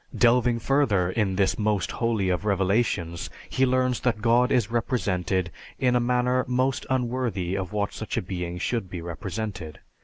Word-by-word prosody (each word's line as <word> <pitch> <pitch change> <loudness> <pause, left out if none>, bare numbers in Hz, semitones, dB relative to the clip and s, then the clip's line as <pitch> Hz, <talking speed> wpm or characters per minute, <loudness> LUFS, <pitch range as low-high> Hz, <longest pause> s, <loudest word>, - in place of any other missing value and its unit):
Delving 120 0 +4
further 115 -8 +2
in 95 -2 0
this 95 +2 +1
most 105 -2 0
holy 115 -5 0
of 90 +1 0
revelations, 95 -4 0 0.2
he 130 0 +2
learns 130 -1 +1
that 115 -4 0
God 120 +3 +3
is 115 -4 +2
represented 95 -7 0 0.3
in 125 -2 +2
a - - +4
manner 125 +1 +1
most 130 +1 0
unworthy 120 -8 -1
of 95 -1 -3
what 105 -1 -1
such - - -4
a - - +1
being 90 -2 -4
should 110 +1 -2
be 90 - -5
represented. 85 0 -5
110 Hz, 160 wpm, -26 LUFS, 95-125 Hz, 0.3 s, Delving